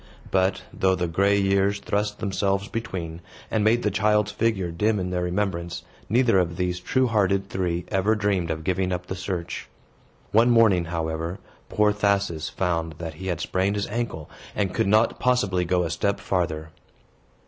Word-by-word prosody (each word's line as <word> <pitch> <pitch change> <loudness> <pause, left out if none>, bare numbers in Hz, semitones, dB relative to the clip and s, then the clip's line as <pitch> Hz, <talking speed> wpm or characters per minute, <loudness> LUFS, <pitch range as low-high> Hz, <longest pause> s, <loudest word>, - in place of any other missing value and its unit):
But, 95 -1 +1
though 95 0 +2
the 90 -1 -1
gray 100 +4 +2
years 100 +1 +2
thrust 105 +1 -1
themselves 100 -1 -1
between, 90 -8 -5 0.3
and 110 -2 +1
made 115 +3 +3
the 105 - +1
child's 105 +1 +2
figure 105 -5 0
dim 105 +6 +1
in 90 0 -3
their 90 0 -1
remembrance, 90 -1 -2 0.3
neither 115 -2 +4
of 85 -2 -1
these 90 -1 -1
true 130 +8 +1
hearted 100 -4 +1
three 90 -2 -2
ever 100 +2 +2
dreamed 100 -5 0
of 80 0 -3
giving 95 +1 0
up 90 0 -3
the 95 - -5
search. 90 -2 -4 0.6
One 115 +3 +5
morning, 110 -7 +5
however, 80 +1 -3 0.3
poor 105 0 +3
Thasus 100 -6 0
found 85 -3 -1
that 80 -1 -5
he 95 - -5
had 85 -3 -2
sprained 95 +4 0
his 100 - -1
ankle, 110 -9 -3 0.3
and 95 -3 0
could - - +1
not 110 +3 +3
possibly 105 -8 +2
go 90 +1 +2
a 80 - -2
step 100 +6 0
farther. 80 -4 -2
95 Hz, 170 wpm, -25 LUFS, 90-105 Hz, 0.6 s, One